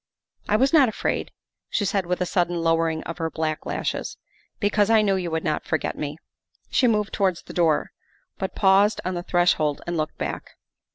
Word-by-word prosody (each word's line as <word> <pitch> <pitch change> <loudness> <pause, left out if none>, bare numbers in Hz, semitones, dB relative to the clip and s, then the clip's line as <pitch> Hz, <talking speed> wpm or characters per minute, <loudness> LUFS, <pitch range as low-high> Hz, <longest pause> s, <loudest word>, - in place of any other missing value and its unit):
' - - -66
' - - -27
I 210 - +3
was 265 +6 +3
not 280 -6 +6
afraid, 220 - -2
' - - -65
' - - -64
she 205 - 0
said 195 -2 0
with 180 +1 -1
a - - +2
sudden 175 0 0
lowering 165 -1 +1
of 170 - -7
her 165 0 -1
black 155 -1 -3
lashes, - - -3 0.2
" - - -39
because 205 0 +2
I 220 -1 +5
knew 195 -2 +2
you 180 -2 -2
would 160 0 -2
not 155 -3 -1
forget 160 - -2
me." 150 0 -4 0.5
She 255 - +3
moved 210 -3 +1
towards 190 -4 0
the - - -10
door, 165 -4 +2 0.5
but 190 - -3
paused 200 +2 +4
on 185 - -1
the 175 - -3
threshold 175 -5 +1
and 175 -1 -2
looked 155 0 -3
back. - - -5
180 Hz, 220 wpm, -24 LUFS, 165-205 Hz, 0.5 s, not